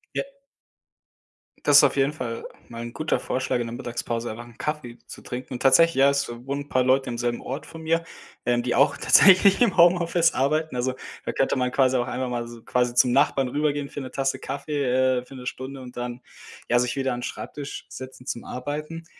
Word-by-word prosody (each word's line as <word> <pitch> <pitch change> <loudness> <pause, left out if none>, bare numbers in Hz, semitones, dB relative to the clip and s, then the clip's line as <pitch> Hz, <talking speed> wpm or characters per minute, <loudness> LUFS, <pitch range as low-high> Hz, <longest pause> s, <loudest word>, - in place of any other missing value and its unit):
Ja. - - 0 1.4
Das 145 -1 +7
ist - - +8
auf - - +3
jeden 135 +2 +2
Fall 120 -6 -5 0.3
mal 115 0 -7
'n 120 0 -7
guter 155 - -1
Vorschlag, 130 -1 -1
in 120 - -2
der 115 +1 -6
Mittagspause 120 -1 -4
einfach 120 +2 -7
'n 120 - -16
Kaffee 150 -6 -4
zu - - -11
trinken. 125 +1 -6
Und 120 - -5
tatsächlich, 165 +5 +5
ja, 135 +1 +5
es 140 0 -1
wohnen 135 +4 -5
paar 130 - +2
Leute 130 0 +2
am 120 - -4
selben 120 0 -2
Ort 140 +4 -5
von 165 0 -11
mir, 165 +1 +1 0.4
ähm, 120 0 +2
die 120 0 -1
auch 140 +3 +3
tatsächlich 195 0 +6
im 230 -6 +4
Homeoffice 170 -1 +4
arbeiten. 155 +2 0
Also, 125 +1 0 0.3
da - - -1
könnte 135 - +1
man 125 -1 0
quasi 130 0 +3
auch 120 - 0
einfach 130 0 -3
mal 120 -1 -3
so 120 -1 -11
quasi 125 +1 0
zum 125 0 +4
Nachbarn 135 -1 +3
rübergehen 145 0 -1
für - - -7
'ne 130 -2 -7
Tasse 135 0 -1
Kaffee, 145 +1 -3
äh, 130 0 +2
für 135 - -14
'ne 125 -2 -8
Stunde 130 +1 -6
und 125 -1 -11
dann, 120 0 -5 0.5
ja, 120 - +4
sich 125 +1 0
wieder 135 -1 -1
an 120 - -6
Schreibtisch 145 +2 -7
setzen 130 0 -10
zum 115 - -4
Arbeiten. 150 +5 -5
130 Hz, 215 wpm, -24 LUFS, 125-145 Hz, 1.4 s, ist